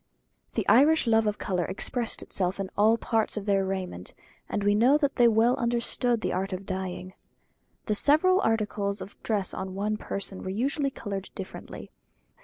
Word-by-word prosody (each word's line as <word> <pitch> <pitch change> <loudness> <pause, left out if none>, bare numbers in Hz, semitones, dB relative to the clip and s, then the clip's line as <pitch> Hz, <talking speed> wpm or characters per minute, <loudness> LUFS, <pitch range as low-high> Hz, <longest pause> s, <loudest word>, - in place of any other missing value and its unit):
The - - -1
Irish 300 +5 +5
love 225 -1 +3
of 210 0 -1
colour 180 -3 -1
expressed 235 +4 -2
itself 185 +1 -1
in 195 -1 -4
all 220 +3 +4
parts 225 -1 0
of 205 - -4
their 200 -2 +2
raiment; 185 - -5 0.3
and 205 - -2
we 205 0 +3
know 245 +7 +5
that 285 -2 -1
they 240 -2 +6
well 230 +2 +4
understood 235 0 0
the - - -1
art 190 +2 -2
of 185 +1 -5
dyeing. 185 -1 -5 0.7
The 215 - 0
several 310 - +4
articles 210 -2 0
of 200 - -9
dress 205 -4 -1
on 190 0 -5
one 210 +2 -1
person 200 -2 -5
were - - -5
usually 275 +8 0
coloured 200 -7 -6
differently. 190 - -8
210 Hz, 175 wpm, -27 LUFS, 195-235 Hz, 0.7 s, they